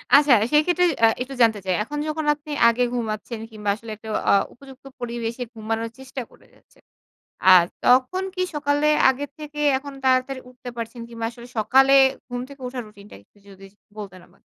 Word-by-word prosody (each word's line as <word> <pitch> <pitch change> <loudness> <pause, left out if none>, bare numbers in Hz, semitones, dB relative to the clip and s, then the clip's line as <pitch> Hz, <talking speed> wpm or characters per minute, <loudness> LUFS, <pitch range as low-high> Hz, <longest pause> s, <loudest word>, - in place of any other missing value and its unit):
আচ্ছা, 285 -2 +6 0.2
সেক্ষেত্রে 350 +4 +3 0.2
আ - - +7
একটু 260 +2 -4
জানতে 220 -3 +4
চাই। 185 - +1
এখন 295 +7 -6
যখন 310 0 -3
আপনি 300 +1 -11 0.2
আগে 235 +2 +2
ঘুমাচ্ছেন 225 -1 -4
কিংবা 210 -1 -4
আসলে 220 +1 -10
একটা 220 +1 -11 0.2
আ - - +5 0.2
উপযুক্ত 270 +1 -16
পরিবেশে 235 0 -4
ঘুমানোর 225 +1 -3
চেষ্টা 265 0 -7
করে - - -21
যাচ্ছেন, - - -27 0.7
আর 175 - +7 0.2
তখন 255 +9 +3
কি 365 - -1
সকালে, 290 0 0 0.2
আগে 265 +2 -4
থেকে 300 -1 -7 0.2
এখন 285 0 -9
তাড়াতাড়ি 260 0 +1
উঠতে 250 0 -10
পারছেন? 230 +1 -6
কিংবা 230 -1 -7
আসলে 235 0 -13
সকালে 265 +5 +4 0.4
ঘুম 245 0 -4
থেকে 280 -1 -14
উঠার 250 0 -5
রুটিনটা 205 -1 -15
একটু 100 - -37
যদি 195 0 -14 0.3
বলতেন 190 -3 -8
আমাকে? - - -28
250 Hz, 175 wpm, -23 LUFS, 225-280 Hz, 0.7 s, আ